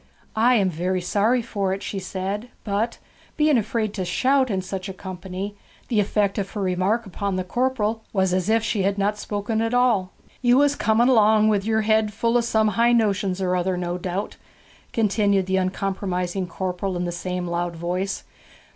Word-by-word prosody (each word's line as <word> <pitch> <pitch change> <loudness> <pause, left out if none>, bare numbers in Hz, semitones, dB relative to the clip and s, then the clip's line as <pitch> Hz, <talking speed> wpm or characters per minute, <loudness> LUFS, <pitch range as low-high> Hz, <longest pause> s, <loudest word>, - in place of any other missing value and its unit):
'I 240 +3 +4
am 195 -4 +3
very 180 +3 -1
sorry 215 +7 +1
for 200 -4 -1
it,' 195 - -9
she 195 - -3
said; 195 +4 -4
but, 215 +3 -1 0.4
being 305 -2 +4
afraid 220 -2 0
to 190 - -3
shout 260 +9 +2
in 195 -3 0
such 190 0 -5
a - - -5
company, 190 +1 -6 0.3
the 225 -4 +2
effect 205 0 +1
of 195 -1 -3
her 210 - -3
remark 190 +5 0
upon 195 0 -3
the 185 - -1
corporal 225 +1 -1
was 190 -2 +1
as 185 +2 0
if 225 0 +3
she 215 -2 0
had 195 +1 +1
not 205 +1 0
spoken 210 +2 -2
at 225 +2 0
all. 225 -7 +2 0.3
'You 245 0 +4
was 285 0 +4
coming 225 0 +3
along 215 -3 +5
with 205 -2 +1
yer 220 0 +2
head 215 -1 +2
full 230 +3 0
of 240 -1 +3
some 220 -2 +2
high 235 +4 +3
notions 200 -4 +1
or 180 0 +1
other 180 0 0
no 175 0 -3
doubt,' 185 +3 -4 0.5
continued 200 -3 +2
the 190 0 0
uncompromising 185 -1 -2
corporal 185 +1 -3
in 175 - -2
the 175 - -2
same 180 +1 -3
loud 175 0 -2
voice. 180 +3 -2
200 Hz, 190 wpm, -23 LUFS, 185-220 Hz, 0.5 s, along